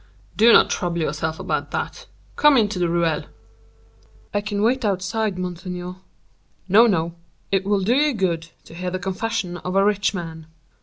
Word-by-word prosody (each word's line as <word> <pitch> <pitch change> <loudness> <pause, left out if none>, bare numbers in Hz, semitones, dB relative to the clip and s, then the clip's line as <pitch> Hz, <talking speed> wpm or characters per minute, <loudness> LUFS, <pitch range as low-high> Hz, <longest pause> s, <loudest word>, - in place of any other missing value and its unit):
"Do 230 +2 +6
not - - +6
trouble 175 -1 -1
yourself 160 +1 -2
about - - -2
that; - - -4 0.3
come 295 -2 +5
into 210 -5 +1
the 175 -1 +1
ruelle." 170 -2 0 1.1
"I 205 - +1
can 205 0 -2
wait 255 +3 +2
outside, 200 +1 -1
monseigneur." 180 0 -5 0.7
"No, 215 +5 +6
no, 170 -5 0 0.4
it 195 -1 +1
will 200 -1 +1
do 210 +6 +2
you 295 -1 +2
good 170 -5 -1 0.2
to - - -13
hear 180 +2 -4
the 185 - -3
confession 190 0 -3
of 180 +1 -5
a 195 0 +4
rich 205 -1 +2
man." 160 -3 -7
185 Hz, 165 wpm, -22 LUFS, 175-210 Hz, 1.1 s, Do